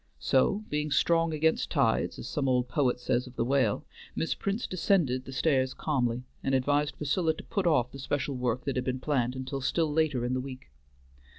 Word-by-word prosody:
So, 135 - +2
being 150 0 -1
strong 165 +4 +2
against 160 +1 +1
tides, - - +1
as - - -7
some 135 -2 -1
old 125 -1 +2
poet 125 -1 +1
says 125 +1 0
of 125 - -12
the 115 - 0
whale, 130 -5 +1 0.3
Miss 165 - 0
Prince 200 +4 -2
descended 165 -8 +1
the - - -8
stairs 130 -2 +1
calmly, 125 -5 -1 0.2
and 135 - +1
advised 145 +3 +1
Priscilla 160 +2 +1
to - - -9
put 195 -3 -1
off 125 -7 +2
the 135 - -9
special 140 +1 -2
work 125 -1 -1
that 140 - -1
had 125 - -1
been 130 0 -1
planned 130 -3 0
until 130 +1 -4
still 155 +3 0
later 150 -6 +1
in 125 - -1
the 130 - 0
week. 130 - -9
135 Hz, 200 wpm, -29 LUFS, 125-155 Hz, 0.3 s, So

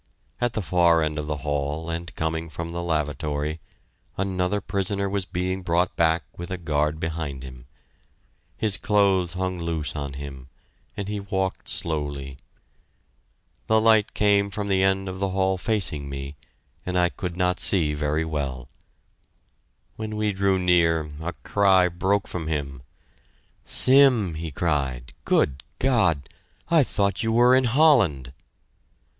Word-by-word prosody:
At 120 -1 0
the 110 - -2
far 85 -2 +3
end 75 0 -2
of 75 - -5
the 75 0 -2
hall 75 +2 -2
and 85 +1 -4
coming 80 +1 -2
from 85 +2 -6
the 85 0 -4
lavatory, 75 -1 -2 0.6
another 95 +1 0
prisoner 100 0 -1
was 100 -1 -2
being 95 +1 -2
brought 90 0 0
back 80 -1 +2
with 85 +1 -7
a 95 - -3
guard 75 -2 -1
behind 80 -5 -4
him. 65 -1 -11 0.9
His 105 -3 +1
clothes 100 -6 +2
hung 95 -1 -2
loose 80 -3 -2
on 70 -2 -4
him, 70 -2 -8 0.5
and 100 - -3
he 105 0 -3
walked 95 -1 -3
slowly. 70 -4 -3 1.3
The 110 0 +4
light 110 -1 +3
came 100 -1 +3
from 100 0 -4
the 95 -1 +2
end 95 0 +1
of 95 0 -5
the 100 0 0
hall 95 0 0
facing 90 -10 0
me, 70 +1 -6 0.5
and 90 0 -2
I 90 -1 +3
could 90 0 -6
not 90 0 +1
see 80 -6 +2
very 75 +2 -1
well. 70 -5 -4 1.3
When 110 -1 -5
we 105 -1 0
drew 95 0 +2
near, 85 -4 +2
a 85 +2 -3
cry 95 -3 +4
broke 95 +4 0
from 85 -3 -5
him 70 -4 -3 0.8
"Sim!" 130 -9 +5
he 80 +1 -5
cried. 70 -5 -2
"Good 70 -1 +1 0.2
God!... 95 - +2 0.4
I 165 -2 +5
thought 100 -6 0
you 115 - 0
were 120 +2 +5
in 130 0 +3
Holland." 115 - +3
85 Hz, 145 wpm, -24 LUFS, 75-100 Hz, 1.3 s, Sim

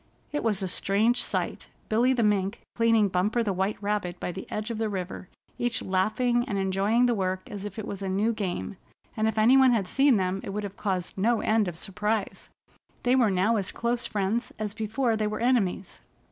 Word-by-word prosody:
It 295 - -2
was 210 -3 +1
a - - -1
strange 215 +6 +1
sight, - - -3 0.2
Billy 235 +4 +3
the 245 -3 +2
Mink 200 0 +1
cleaning 230 -2 +4
Bumper 200 +6 +1
the 205 -3 -1
White 190 +3 -1
Rabbit 200 -4 -2
by - - -3
the 190 +2 -8
edge 215 +2 -3
of 225 - -4
the 220 -1 0
river, 185 -1 -5 0.3
each 240 0 -1
laughing 220 +6 +1
and 205 -5 -2
enjoying 195 +5 +2
the 245 - +3
work 185 -3 -2
as 205 -1 -6
if 205 - -7
it 220 - -4
was 200 -1 -6
a 195 - -2
new 205 +5 +1
game, 195 -2 -4 0.4
and 220 0 +1
if 220 0 -1
any 235 +5 +6
one 260 -2 +6
had 205 -5 0
seen 270 +2 +4
them 190 0 -1
it - - -6
would 210 +2 -3
have 200 -1 -6
caused 190 -2 -3
no 230 +3 +2
end 215 -2 +2
of 170 -2 -5
surprise. 210 +3 -3 0.5
They 250 +1 +3
were 245 -5 +4
now 195 +4 +2
as 195 -2 -2
close 235 +1 -1
friends 210 +4 -1
as 210 -1 -3
before 225 +3 0
they 215 -1 0
were 215 0 -3
enemies. 220 -7 0
210 Hz, 215 wpm, -27 LUFS, 195-230 Hz, 0.5 s, any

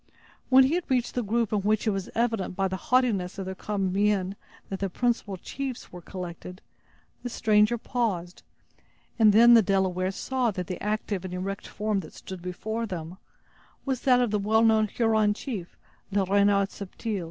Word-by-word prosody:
When 260 0 +8
he 265 +4 +2
had 350 -2 -2
reached 250 -2 +1
the 250 - 0
group 225 0 0
in 210 - +2
which 210 +3 +1
it 215 - +2
was 195 -2 -4
evident, 225 -5 0
by 195 +1 +1
the 190 - -3
haughtiness 225 -9 +2
of 195 - -4
their 190 - -4
common 195 -1 -2
mien, 200 -1 +1 0.3
that 195 - -4
the 195 - -1
principal 220 -2 -1
chiefs 260 +6 -6
were 180 - -9
collected, 180 0 -8 0.6
the 245 - -4
stranger 215 0 +3
paused, 205 -8 -2 0.8
and 215 -2 +7
then 235 +3 +7
the 230 - +8
Delawares 190 -1 0
saw 260 -2 0
that 185 -4 -4
the 180 +1 -6
active 210 -2 -2
and 185 -1 -5
erect 195 +2 -4
form 210 -1 -1
that 160 -5 -9
stood 190 -2 -9
before 220 +6 -4
them 180 -1 -6 0.7
was 265 -3 -1
that 250 -2 +4
of 245 -4 +1
the 210 - +1
well 220 +3 +3
known 220 -1 +4
Huron 220 -2 +2
chief, 205 -9 -6 0.3
Le 195 -1 +1
Renard 200 0 +3
Subtil. 205 +2 -5
205 Hz, 185 wpm, -27 LUFS, 190-230 Hz, 0.8 s, When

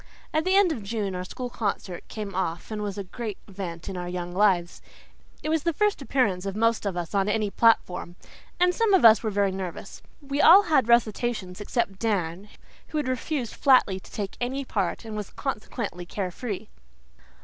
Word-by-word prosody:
At 310 +1 +1
the 375 +1 +3
end 395 -3 +5
of 260 -8 -3
June 200 -1 -3
our 180 0 -3
school 245 +6 -6
concert 195 -5 -3
came 210 -3 -6
off 180 0 -3
and 215 -1 -3
was 205 -2 -4
a 200 - -3
great 215 +1 -6
event 185 -4 -6
in 195 - -5
our 175 0 -4
young 175 0 -4
lives. 180 -3 +2 0.6
It 310 - -2
was 320 0 +2
the 335 +2 0
first 420 -5 +1
appearance 205 -9 0
of 195 - -3
most 230 -1 +1
of 185 -3 -3
us 175 +1 -4
on 200 0 +2
any 210 -1 0
platform, 185 -7 +2 0.4
and 360 0 +4
some 440 -1 +3
of 365 - +4
us 225 -1 +8
were 220 - -1
very 200 -1 +1
nervous. 185 -2 -6 0.2
We 280 -1 -2
all 380 +5 +9
had 300 - +2
recitations, 225 -4 +1
except 205 -2 -2
Dan, 195 -3 -1 0.4
who 310 - -4
had 295 - -1
refused 255 -1 -2
flatly 250 -8 +4
to - - -17
take 200 -2 -5
any 265 +3 -2
part 200 -1 -2
and 220 -1 -6
was 210 -2 -5
consequently 210 -8 -4
care 185 -1 -3
free. 205 - -5
210 Hz, 195 wpm, -26 LUFS, 190-255 Hz, 0.6 s, all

